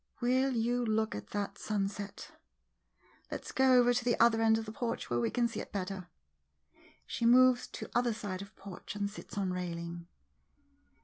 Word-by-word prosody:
Will 260 +2 +2
you 240 +2 +1
look 220 -1 +1
at - - -6
that 200 -1 -4
sunset— 205 -1 -3 1.0
let - - -5
's - - -6
go 265 -1 +4
over 245 0 +5
to 245 0 0
the 240 -1 +1
other 230 -1 +5
end 220 0 +5
of 225 - -4
the 215 - -6
porch, 230 - -3
where 120 - +2
we 120 - +1
can 240 -1 +1
see 230 -2 -5
it - - -7
better. 190 -2 -4 1.0
[She - - -4
moves 250 +1 +6
to - - -7
other 240 0 +2
side 205 -4 -4
of 200 +1 -11
porch 195 +1 -9
and 205 -1 -1
sits 205 0 -10
on 190 -2 0
railing. 170 -1 -5
220 Hz, 185 wpm, -32 LUFS, 195-240 Hz, 1.0 s, moves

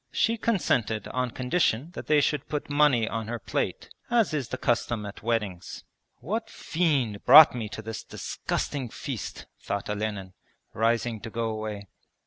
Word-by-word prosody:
She 230 - +2
consented 125 - 0
on 125 -1 -1
condition 130 +2 0
that - - -8
they 150 -1 +5
should 150 +1 -1
put 150 -1 -3
money 145 -6 +4
on 110 -1 -3
her 120 +1 -3
plate, 110 - -3 0.2
as 235 -7 +2
is 140 -5 -1
the - - -3
custom 120 -2 0
at 100 - -8
weddings. 105 -6 -3 0.4
'What 220 +8 -3
fiend 140 - 0
brought 150 +4 +10
me 115 -4 -4
to 110 - -7
this 110 0 -6
disgusting 135 -5 -3
feast?' 125 -1 -6 0.2
thought - - -3
Olenin, 105 -3 -3 0.4
rising 115 0 +1
to 115 - -6
go 115 0 -2
away. 110 -2 -5
120 Hz, 155 wpm, -27 LUFS, 110-150 Hz, 0.4 s, brought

